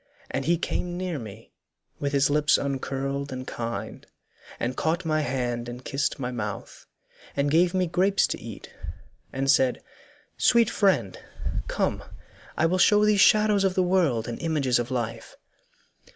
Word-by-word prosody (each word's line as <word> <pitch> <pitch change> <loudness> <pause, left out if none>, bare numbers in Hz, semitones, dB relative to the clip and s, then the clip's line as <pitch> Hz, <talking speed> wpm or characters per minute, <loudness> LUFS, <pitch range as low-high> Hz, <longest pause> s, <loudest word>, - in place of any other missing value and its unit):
And 135 - -2
he 170 +1 +3
came 175 +1 -3
near 180 -4 -3
me, 110 -1 -11 0.5
with 140 - -1
his 140 0 +2
lips 150 0 +4
uncurled 140 0 -3
And 130 0 -5
kind, 115 -2 -5 0.6
and 125 +2 -2
caught 165 +5 -1
my 155 -1 +1
hand 120 -3 -2
and 125 +1 -9
kissed 140 0 -1
my 125 -2 -3
mouth, 105 -5 -6 0.5
And 140 0 +1
gave 175 +3 +3
me 185 -1 +2
grapes 185 +4 +2
to - - -4
eat, - - -10 0.6
and 135 +1 -2
said, 130 -2 +2 0.6
'Sweet 235 -2 +4
friend, 180 - +1 0.5
Come - - -1 0.5
I 155 - +3
will 180 +3 +1
show 210 +3 +5
thee 210 0 +4
shadows 210 0 +5
of 190 -1 +1
the 185 - +3
world 170 -11 +1
And 120 - -5
images 145 -7 +1
of 120 - -3
life. 115 -3 -4
140 Hz, 155 wpm, -26 LUFS, 125-180 Hz, 0.6 s, show